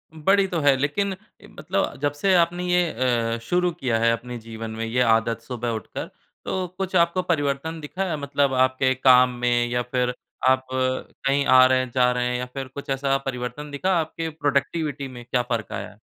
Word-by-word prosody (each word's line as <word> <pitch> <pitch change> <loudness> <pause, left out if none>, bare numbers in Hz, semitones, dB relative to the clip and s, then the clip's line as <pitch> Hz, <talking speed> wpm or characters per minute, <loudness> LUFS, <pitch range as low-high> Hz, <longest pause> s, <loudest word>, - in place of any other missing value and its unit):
बड़ी 195 +5 +3
तो 175 -3 -2
है। 145 -1 +5
लेकिन 190 +9 -1 0.3
ए, - - -14
मतलब 190 +5 -3
जब 145 -1 +1
से 190 +6 +1
आपने 175 +1 +2
ये 180 -2 +2 0.4
अ, - - -4
शुरू 180 +6 +1
किया 130 -9 -1
है 115 0 +3
अपने 120 +1 -4
जीवन 115 0 -7
में 115 +1 -4
ये 120 +3 0
आदत 115 -1 +2
सुबह 120 0 -4
उठकर, - - -7 0.4
तो 185 -1 -2
कुछ 190 -1 -3
आपको 170 +1 +3
परिवर्तन 160 -1 -1
दिखा 180 +3 -3
मतलब 140 -1 0
आपके 130 0 +2
काम 125 -1 +6
में 120 0 +2
या 120 0 0
फिर 125 -1 +1 0.3
आप 130 0 +3
कहीं 130 +2 -1
आ 130 -1 +7
रहे 130 0 +3
हैं 130 - -2
जा 125 0 +3
रहे 125 0 0
हैं 125 0 -1
या 125 - -3
फिर 135 -1 -5
कुछ 140 +2 -10
ऐसा 135 0 +1
परिवर्तन 130 +3 -5
दिखा 185 +7 0
आपकी 160 +1 -3
प्रोडक्टिविटी 145 -1 -1
में 125 -2 -10
क्या 125 +1 +1
फ़र्क़ 115 -3 -3
आया - - -5
है? - - -19
135 Hz, 195 wpm, -24 LUFS, 125-160 Hz, 0.4 s, आ